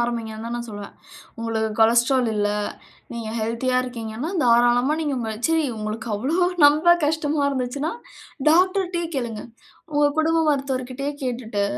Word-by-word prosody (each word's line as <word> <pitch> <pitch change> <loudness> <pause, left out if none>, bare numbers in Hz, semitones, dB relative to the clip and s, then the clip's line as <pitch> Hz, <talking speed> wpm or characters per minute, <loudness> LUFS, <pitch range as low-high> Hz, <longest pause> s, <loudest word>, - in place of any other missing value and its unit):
ஆரம்பிங்கன்னு 230 -2 -3
தான் 235 - -4
நான் 240 0 -5
சொல்லுவேன். 205 -1 -8 0.5
உங்களுக்கு 225 -1 -1
கொலஸ்டரால் 235 +2 +4
இல்ல. 205 0 +1 0.7
நீங்க 230 -2 -5
ஹெல்த்தியா 230 +3 0
இருக்கீங்கன்னா, 235 +3 -5
தாராளமா 240 +3 +4
நீங்க 290 -4 -1 0.3
சரி 325 -2 +2
உங்களுக்கு 215 +2 -5
அவ்ளோ 325 - +1 0.2
நம்ப 310 +4 +5
கஷ்டமா 305 -1 0
இருந்துச்சுன்னா, 275 +4 -2 0.6
டாக்டர்டயே 360 0 +2
கேளுங்க. 235 -5 -3 0.5
உங்க 290 0 +4
குடும்ப 325 +1 +2
மருத்துவர் 270 -3 -1
கிட்டயே 275 +3 -4
கேட்டுட்டு 235 -5 -2
250 Hz, 125 wpm, -23 LUFS, 230-295 Hz, 0.7 s, நம்ப